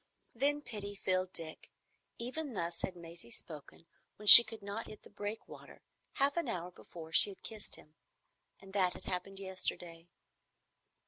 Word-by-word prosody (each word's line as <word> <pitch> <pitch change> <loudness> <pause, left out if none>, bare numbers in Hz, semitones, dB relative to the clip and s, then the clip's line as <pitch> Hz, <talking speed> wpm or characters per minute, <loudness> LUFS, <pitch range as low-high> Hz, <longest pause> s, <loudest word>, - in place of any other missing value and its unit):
Then 290 +4 -1
pity 205 -4 -7
filled 185 -1 -1
Dick. 160 -3 -7 0.5
Even 260 +2 -6
thus 170 -2 -4
had 185 - -4
Maisie 170 -6 -12
spoken 155 +5 -6 0.3
when 210 - -12
she 235 - +14
could 225 -3 -10
not 205 +3 -6
hit 215 - -13
the - - -17
breakwater, 205 +2 -9 0.3
half 280 +3 +1
an 340 - -1
hour 175 0 -5
before 165 -2 -13
she - - +6
had 195 - -13
kissed 215 -2 -8
him. 155 - -18 0.7
And 195 0 -15
that 185 -3 +1
had - - -12
happened 190 +1 -5
yesterday. 175 -3 -6
195 Hz, 155 wpm, -33 LUFS, 170-220 Hz, 0.7 s, she